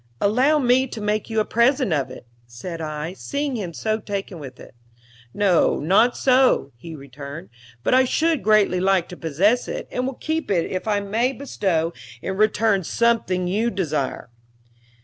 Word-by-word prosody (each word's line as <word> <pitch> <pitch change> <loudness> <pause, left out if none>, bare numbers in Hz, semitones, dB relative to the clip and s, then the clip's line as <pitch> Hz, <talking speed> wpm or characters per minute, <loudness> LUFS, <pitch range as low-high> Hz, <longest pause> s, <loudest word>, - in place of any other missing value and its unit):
"Allow 255 +9 +3
me 260 -1 +3
to 235 - -7
make 210 +1 -1
you 220 -1 0
a 215 - +1
present 245 - +2
of 140 -3 -1
it," 130 - -11 0.2
said 165 +9 -7
I, 155 +2 -4
seeing 280 +6 -3
him 195 -7 -4
so 215 +6 -2
taken 200 -4 -5
with 130 -3 -10
it. - - -13 0.6
"No, 195 -1 +2
not 195 +10 +3
so," 255 - +3
he 160 +7 -10
returned. 140 -5 -9 0.3
"But - - +1
I 260 0 +5
should 320 +3 +1
greatly 210 -4 +3
like 190 -2 +2
to 180 - -8
possess 185 - +1
it, - - -5
and 250 +1 -2
will 265 - -4
keep 320 +3 -3
it 175 -4 +1
if 185 +4 -4
I 205 -1 +1
may 225 +6 0
bestow 180 - -1 0.3
in 190 - -4
return 215 -1 +2
something 190 -4 +1
you 215 +6 +1
desire." 150 - -3
200 Hz, 170 wpm, -22 LUFS, 165-240 Hz, 0.6 s, I